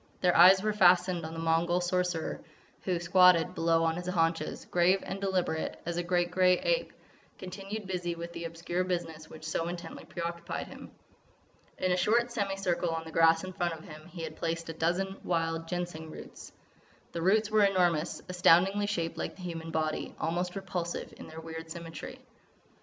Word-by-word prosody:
Their 180 -1 +3
eyes 190 +3 +8
were 215 0 +1
fastened 180 -3 +4
on 160 - -8
the 165 - -5
Mongol 165 +2 +2
Sorcerer, 180 -2 -1 0.4
who, 180 -2 0
squatted 180 0 +5
below 165 -2 +2
on 165 0 +1
his 180 0 -5
haunches, 165 -2 0
grave 180 +2 +3
and 195 - -5
deliberate 185 -5 -1
as 170 0 -3
a - - +1
great 175 0 0
grey 180 0 +4
ape, - - 0 0.5
continued 195 +3 -6
busy 180 -2 -2
with 170 0 -7
the 170 - -5
obscure 165 +2 -2
business 165 -4 -4
which 155 - -12
so 165 +1 -1
intently 175 0 -6
preoccupied 170 0 -4
him. - - -10 0.9
In 185 - 0
a 180 - +2
short 235 +6 +2
semi 200 -4 -1
circle 180 -3 0
on 165 0 -2
the 160 - -9
grass 165 +1 +4
in 185 0 -6
front 175 -2 -1
of 160 - -13
him 155 -2 -11
he 170 -1 -8
had 155 -1 -6
placed 165 0 -3
a - - -3
dozen 180 +4 -1
wild 165 -1 -1
Ginseng 175 -2 -4
roots. - - -10 0.6
The 170 - -4
roots 210 +4 +3
were 215 -1 +5
enormous, 175 -5 +2
astoundingly 180 +3 +4
shaped 170 -5 -2
like - - -3
the 185 - -11
human 165 -2 -5
body, 155 -1 -2
almost 175 +3 -1
repulsive 180 -3 -4
in - - -10
their 160 +1 -9
weird 160 0 -8
symmetry. 165 -1 -7
175 Hz, 180 wpm, -30 LUFS, 165-185 Hz, 0.9 s, eyes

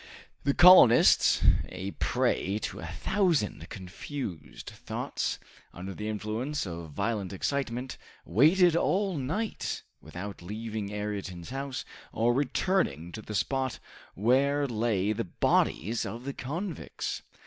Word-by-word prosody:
The 140 - +2
colonists, 175 -10 +7 0.3
a 95 +2 -5
prey 100 0 0
to - - -4
a 80 - -6
thousand 170 - 0
confused 100 - -7
thoughts, - - -3 0.4
under 95 +2 -6
the 105 +3 -5
influence 110 +7 -2
of 85 -2 -6
violent 100 +3 -2
excitement, 130 +4 -3 0.3
waited 160 - +5
all 190 +2 +1
night, 160 - -3 0.2
without 90 +6 -8
leaving 105 +2 -5
Ayrton's 100 -3 -5
house, 135 0 -4 0.3
or 115 +2 +2
returning 135 - 0
to 110 - -7
the 105 0 -7
spot 130 +7 -1 0.4
where 140 +7 +2
lay 110 -4 0
the 115 0 -3
bodies 105 +4 +1
of 120 +2 -6
the 140 +1 -4
convicts. 165 +7 -4
115 Hz, 115 wpm, -29 LUFS, 100-140 Hz, 0.4 s, colonists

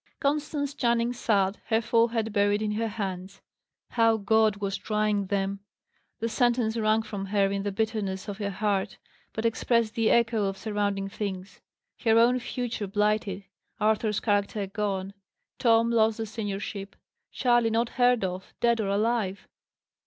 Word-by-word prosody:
Constance 290 0 -1
Channing 235 -2 +1
sat, 200 -4 +1
her 225 - +3
forehead 230 -1 +1
buried 205 0 +2
in 210 - -1
her 225 +2 -1
hands. 195 -3 -5 0.5
How 230 -1 +3
God 220 0 +3
was 200 -1 -3
trying 210 -2 0
them! 195 0 -1 0.6
The 230 - -1
sentence, 235 -1 +1
wrung 220 0 +2
from 200 -3 -5
her 195 -1 +2
in 200 0 -1
the 205 0 -2
bitterness 205 -2 -2
of 205 0 -6
her 200 -1 -2
heart, 200 0 -1 0.3
but 220 - -4
expressed 230 -1 +1
the 225 -1 +2
echo 230 -3 +3
of 195 0 -2
surrounding 205 -2 -1
things. 195 -2 -6 0.4
Her 225 -1 +4
own 245 +2 +5
future 240 -4 -4
blighted; 210 -1 0 0.4
Arthur's 215 0 +1
character 205 -1 0
gone; 195 -1 -3 0.5
Tom 230 -1 +4
lost 220 -1 +3
the 225 - -3
seniorship; 205 -2 -5 0.4
Charley 240 -3 +2
not 230 +1 +1
heard 245 -3 +3
of, 185 0 -5
dead 235 -1 +2
or 205 - -2
alive! 205 -1 0
215 Hz, 150 wpm, -27 LUFS, 200-230 Hz, 0.6 s, own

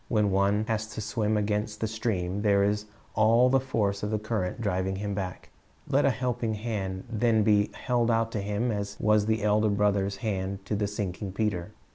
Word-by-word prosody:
When 105 -3 +2
one 100 +2 +2
has 110 -1 -1
to - - -4
swim 110 0 0
against 105 +1 -1
the - - 0
stream, 100 -4 -2
there 100 -2 +3
is 105 +1 0 0.3
all 115 +4 +5
the 135 - +5
force 105 -7 -1
of 105 - -2
the 110 - 0
current 105 -3 -2
driving 95 -3 -1
him 100 +1 -3
back. 95 -2 -5 0.4
Let 140 +2 +3
a - - +5
helping 125 -4 -1
hand 100 -4 -3
then 115 -1 +2
be 105 -1 +3
held 120 -2 0
out 115 0 +1
to 105 - -2
him 105 +4 -1
as 100 -1 -4
was 105 0 +3
the 110 -1 +1
Elder 105 +1 +3
Brother's 100 -1 +1
hand 95 -1 -2
to 105 - -1
the 105 0 0
sinking 100 -1 -4
Peter. 100 -5 -2
105 Hz, 195 wpm, -28 LUFS, 100-110 Hz, 0.4 s, all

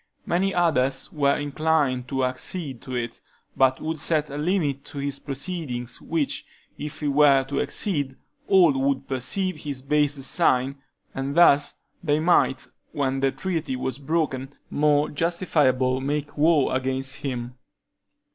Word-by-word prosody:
Many 190 +3 +1
others 155 -8 +1
were 140 -2 +2
inclined 145 -3 0
to 135 -1 0
accede 130 +1 -3
to 130 - -6
it, 120 -1 -4 0.3
but 130 -1 +3
would 160 0 -3
set 155 -2 0
a 145 - -5
limit 150 -5 0
to - - -10
his 140 0 -3
proceedings, 135 -4 -4
which, 160 -4 -2 0.3
if 150 +1 -7
he 150 - -1
were 140 -1 +5
to 140 +1 -3
exceed, 145 -10 0 0.3
all 185 -4 +6
would 135 0 0
perceive 155 +8 -1
his 140 -3 -5
base 145 0 +2
design, 135 -1 +1 0.4
and 135 +1 -3
thus 145 -4 +5 0.3
they 150 -2 +2
might, 160 -5 +2 0.3
when 135 -2 0
the 135 0 +2
treaty 160 -1 -3
was 130 +1 -3
broken, 140 -3 -1 0.2
more 150 0 +3
justifiably 145 -6 +1
make 145 +1 -3
war 150 -3 +3
against 130 +1 -1
him. 125 -3 -4
140 Hz, 140 wpm, -24 LUFS, 130-155 Hz, 0.4 s, all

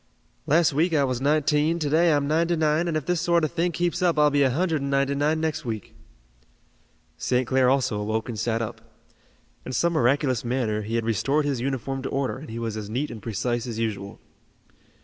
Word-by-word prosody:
"Last 160 0 +3
week 165 +4 +2
I 145 - +3
was 130 -2 -1
nineteen, 150 +2 +2
to 155 -3 -2
day 165 +3 +3
I'm 145 -2 +1
ninety 165 +3 +2
nine, 155 +1 +1
and 160 -2 0
if 155 - -4
this 180 -2 0
sort 170 -1 +2
of 155 - 0
thing 175 +1 0
keeps 175 +1 -1
up 175 -3 +2
I'll 150 0 +4
be 145 0 +2
a 135 - +4
hundred 160 +2 0
and 140 - -3
ninety 140 0 +1
nine 150 +3 +1
next 155 -1 -2
week." 110 -5 -5 1.2
St. 125 0 0
Clair 130 +1 +3
also 130 -5 +1
awoke 110 +1 -2
and 115 -4 -5
sat 115 +1 0
up. 115 0 -7 0.8
In 130 - -6
some 170 +7 +1
miraculous 130 -3 +1
manner 120 -3 -1
he 110 +2 -4
had 115 -1 0
restored 135 +7 +1
his 135 -4 -1
uniform 135 0 -3
to 135 - -4
order 135 -1 -2
and 155 - -10
he 115 - -6
was 115 -2 -3
as 105 -1 -6
neat 130 +6 -2
and 110 -2 -8
precise 115 +3 -2
as 115 -2 -5
usual. 105 -3 -4
140 Hz, 215 wpm, -25 LUFS, 115-155 Hz, 1.2 s, I'll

